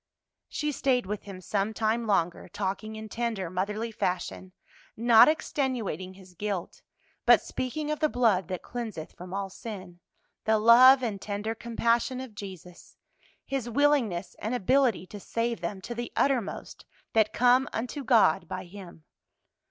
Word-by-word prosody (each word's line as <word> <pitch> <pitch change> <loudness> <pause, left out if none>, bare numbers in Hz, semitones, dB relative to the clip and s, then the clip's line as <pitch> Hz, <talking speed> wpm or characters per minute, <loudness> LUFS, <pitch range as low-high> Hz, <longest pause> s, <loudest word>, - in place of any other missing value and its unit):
She 300 -1 -2
stayed 255 -5 +1
with 205 +2 -5
him 190 -2 -9
some 200 +3 -1
time 225 +1 0
longer, 175 -4 0
talking 200 +4 -4
in 220 0 -7
tender, 220 -6 -3
motherly 210 +5 -2
fashion; 185 -2 -3 0.5
not 230 0 +7
extenuating 245 - -1
his 185 -1 -16
guilt, 195 -1 -4 0.4
but - - +7
speaking 300 +4 -4
of 305 - -2
the 310 - +2
blood 220 - +2
that 185 -1 -5
cleanseth 220 -10 -6
from 180 +1 -11
all 195 0 -3
sin, 185 -5 -9 0.4
the 220 0 +3
love 250 +4 +7
and 205 -5 -3
tender 210 +2 -3
compassion 235 +2 0
of 260 -4 -8
Jesus, 185 -4 -11 0.5
His 265 -3 -3
willingness 235 -9 +1
and 220 +4 -2
ability 245 -2 +2
to 205 +2 -10
save 230 +2 -2
them 190 +3 -4
to 240 - -6
the 240 0 -5
uttermost 255 -7 -1 0.3
that 220 -1 +3
come 250 +3 +4
unto 250 +5 -4
God 205 -9 +4
by 185 +2 -5
Him. 175 -3 -12
220 Hz, 150 wpm, -28 LUFS, 190-240 Hz, 0.5 s, not